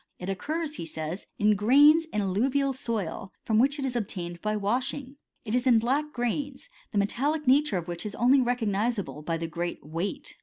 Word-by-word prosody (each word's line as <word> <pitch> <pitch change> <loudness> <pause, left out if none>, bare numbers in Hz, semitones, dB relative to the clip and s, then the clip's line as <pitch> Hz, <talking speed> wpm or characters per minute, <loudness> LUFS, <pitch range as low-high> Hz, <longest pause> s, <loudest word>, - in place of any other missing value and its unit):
It 180 - -6
occurs, 305 - -3
he - - -5
says, 160 +3 -5
in 210 0 +4
grains 290 +10 +6
in 210 -9 -2
alluvial 260 +8 +1
soil, 215 -7 -4
from 220 -1 +2
which 280 +4 +3
it 275 - -2
is 255 -2 -3
obtained 175 -6 -4
by 215 0 -1
washing. 255 +6 -2 0.3
It 215 - -3
is 250 +1 +1
in 240 -3 +6
black 275 +7 0
grains, 270 - -3 0.2
the 210 - -3
metallic 285 +10 0
nature 270 -5 +4
of 170 -1 -5
which 175 -1 -5
is 210 -1 -5
only 260 +3 +4
re 245 0 +1
cognisable 210 -6 -2
by 165 +1 -1
the 165 - -4
great 170 +1 -4
weight. 180 - -4
230 Hz, 195 wpm, -27 LUFS, 195-275 Hz, 0.3 s, grains